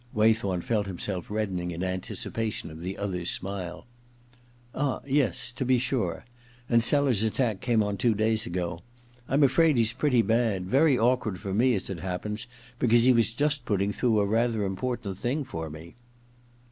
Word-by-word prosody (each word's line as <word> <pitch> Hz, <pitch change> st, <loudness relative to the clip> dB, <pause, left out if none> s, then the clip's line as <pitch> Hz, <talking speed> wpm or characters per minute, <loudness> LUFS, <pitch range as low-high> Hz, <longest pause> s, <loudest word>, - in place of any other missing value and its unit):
Waythorn 110 Hz, -4 st, +2 dB
felt 105 Hz, 0 st, -1 dB
himself 95 Hz, -1 st, -4 dB
reddening 95 Hz, -5 st, -2 dB
in 85 Hz, +1 st, -4 dB
anticipation 95 Hz, +2 st, -3 dB
of 80 Hz, -, -10 dB
the 95 Hz, +2 st, -5 dB
other's 90 Hz, -3 st, -3 dB
smile. 95 Hz, -1 st, -4 dB, 0.5 s
* 120 Hz, -1 st, -30 dB
Ah 140 Hz, -2 st, -1 dB
— -, -, -22 dB
yes; 130 Hz, -, 0 dB
to 120 Hz, -, -4 dB
be 130 Hz, 0 st, +3 dB
sure. 120 Hz, -8 st, -2 dB, 0.4 s
And 115 Hz, -1 st, +4 dB
Sellers's 135 Hz, -4 st, +3 dB
attack 110 Hz, -1 st, 0 dB
came 115 Hz, -3 st, +2 dB
on 105 Hz, -1 st, -2 dB
two 115 Hz, +2 st, +2 dB
days 110 Hz, +1 st, +1 dB
ago. 90 Hz, 0 st, -3 dB, 0.5 s
I'm 140 Hz, +3 st, +3 dB
afraid 150 Hz, +2 st, +4 dB
he's 115 Hz, -1 st, +3 dB
pretty 130 Hz, -2 st, +2 dB
bad. 110 Hz, -5 st, +1 dB
Very 135 Hz, -, +3 dB
awkward 115 Hz, -4 st, +1 dB
for 100 Hz, -2 st, -5 dB
me, 120 Hz, +4 st, +3 dB
as 95 Hz, -, -3 dB
it 95 Hz, -3 st, -5 dB
happens, 95 Hz, +5 st, -4 dB, 0.3 s
because 120 Hz, -1 st, +4 dB
he 130 Hz, +1 st, +6 dB
was 115 Hz, -1 st, +3 dB
just 145 Hz, +2 st, 0 dB
putting 100 Hz, -2 st, 0 dB
through 110 Hz, 0 st, +1 dB
a 100 Hz, -, +2 dB
rather 115 Hz, +1 st, +1 dB
important 100 Hz, 0 st, -3 dB
thing 140 Hz, +5 st, -1 dB
for 80 Hz, -12 st, -6 dB
me.' 80 Hz, +3 st, -10 dB
110 Hz, 175 wpm, -27 LUFS, 95-125 Hz, 0.5 s, he